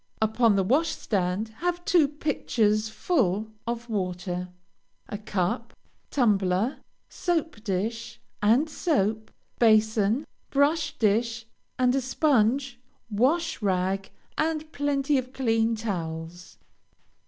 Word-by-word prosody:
Upon 220 Hz, 0 st, +3 dB
the 195 Hz, -, +2 dB
washstand, 215 Hz, -, 0 dB
have 350 Hz, +3 st, -2 dB
two 350 Hz, -7 st, +4 dB
pitchers 225 Hz, -7 st, 0 dB
full 220 Hz, -, 0 dB, 0.2 s
of 235 Hz, 0 st, -3 dB
water, 180 Hz, -3 st, -3 dB, 0.6 s
a 205 Hz, -, -5 dB
cup, 205 Hz, +2 st, -2 dB, 0.4 s
tumbler, 205 Hz, -2 st, +2 dB, 0.3 s
soap 325 Hz, -, -2 dB
dish 225 Hz, +3 st, -3 dB, 0.2 s
and 235 Hz, +9 st, +4 dB
soap, 220 Hz, -, 0 dB, 0.3 s
basin, 220 Hz, +2 st, +3 dB, 0.2 s
brush 295 Hz, +2 st, +1 dB
dish, 230 Hz, +2 st, +1 dB, 0.3 s
and 250 Hz, -1 st, +3 dB
a 270 Hz, -, +1 dB
sponge, 260 Hz, -2 st, +1 dB, 0.3 s
wash 300 Hz, +11 st, +1 dB
rag, 190 Hz, 0 st, 0 dB, 0.3 s
and 310 Hz, 0 st, -1 dB
plenty 285 Hz, -1 st, +1 dB
of 255 Hz, 0 st, -7 dB
clean 225 Hz, -3 st, +1 dB
towels. 175 Hz, -5 st, -5 dB
225 Hz, 100 wpm, -26 LUFS, 205-280 Hz, 0.6 s, two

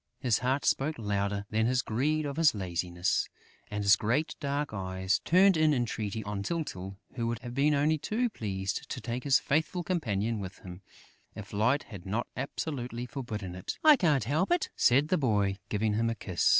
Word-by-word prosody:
His 120 Hz, -5 st, +2 dB
heart 130 Hz, +3 st, 0 dB
spoke 150 Hz, +3 st, +1 dB
louder 100 Hz, -2 st, -1 dB
than 110 Hz, +1 st, +2 dB
his 125 Hz, 0 st, +1 dB
greed 150 Hz, +7 st, 0 dB
or 140 Hz, -, -2 dB
his 160 Hz, -5 st, +4 dB
laziness; 90 Hz, -1 st, -1 dB, 0.4 s
and 105 Hz, 0 st, -3 dB
his 100 Hz, +1 st, +7 dB
great 120 Hz, +9 st, 0 dB
dark 145 Hz, -3 st, -2 dB
eyes 95 Hz, -1 st, -1 dB
turned 190 Hz, +2 st, +5 dB
in 155 Hz, -2 st, +4 dB
entreaty 110 Hz, -3 st, -2 dB
on 105 Hz, -1 st, -4 dB
Tyltyl, 100 Hz, -, -4 dB, 0.2 s
who 115 Hz, -2 st, -2 dB
would 120 Hz, 0 st, -1 dB
have 120 Hz, -1 st, -6 dB
been 145 Hz, +3 st, +3 dB
only 150 Hz, +2 st, +2 dB
too 225 Hz, +10 st, 0 dB
pleased 100 Hz, -, -4 dB
to -, -, -4 dB
take 120 Hz, +1 st, -4 dB
his 140 Hz, -2 st, +5 dB
faithful 160 Hz, +4 st, 0 dB
companion 115 Hz, -, -1 dB
with 95 Hz, -1 st, -7 dB
him, 90 Hz, 0 st, -10 dB, 0.5 s
if 105 Hz, -1 st, -9 dB
Light 115 Hz, +8 st, +2 dB
had 100 Hz, -4 st, -10 dB
not 110 Hz, +5 st, -1 dB
absolutely 125 Hz, -3 st, -4 dB
forbidden 110 Hz, -8 st, -5 dB
it: 90 Hz, 0 st, -5 dB
"I 310 Hz, -1 st, +9 dB
can't 155 Hz, -, +2 dB
help 145 Hz, +8 st, 0 dB
it," 350 Hz, -1 st, +2 dB
said 140 Hz, +5 st, +4 dB
the 185 Hz, -, +2 dB
boy, 100 Hz, -7 st, +1 dB
giving 105 Hz, 0 st, 0 dB
him 115 Hz, +2 st, +1 dB
a 115 Hz, -, -2 dB
kiss. 95 Hz, -5 st, 0 dB
115 Hz, 190 wpm, -30 LUFS, 100-145 Hz, 0.5 s, I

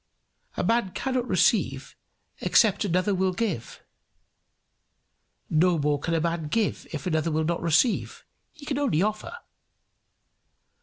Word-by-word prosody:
A -, -, 0 dB
man 230 Hz, -5 st, +1 dB
cannot 255 Hz, -2 st, -2 dB
receive -, -, +1 dB, 0.4 s
except 210 Hz, -4 st, +3 dB
another 185 Hz, +1 st, +1 dB
will 190 Hz, 0 st, 0 dB
give; 180 Hz, -, -4 dB, 1.6 s
no 170 Hz, +2 st, +2 dB
more 145 Hz, -1 st, 0 dB
can 165 Hz, +3 st, -2 dB
a -, -, +2 dB
man 165 Hz, -1 st, -2 dB
give 215 Hz, +6 st, -1 dB
if 150 Hz, -4 st, -6 dB
another 160 Hz, -2 st, 0 dB
will 160 Hz, 0 st, 0 dB
not 170 Hz, +1 st, -1 dB
receive; 170 Hz, +8 st, +1 dB, 0.3 s
he 300 Hz, -, -14 dB
can 285 Hz, -1 st, -2 dB
only 220 Hz, -, +1 dB
offer. 215 Hz, -, -3 dB
180 Hz, 130 wpm, -26 LUFS, 160-225 Hz, 1.6 s, except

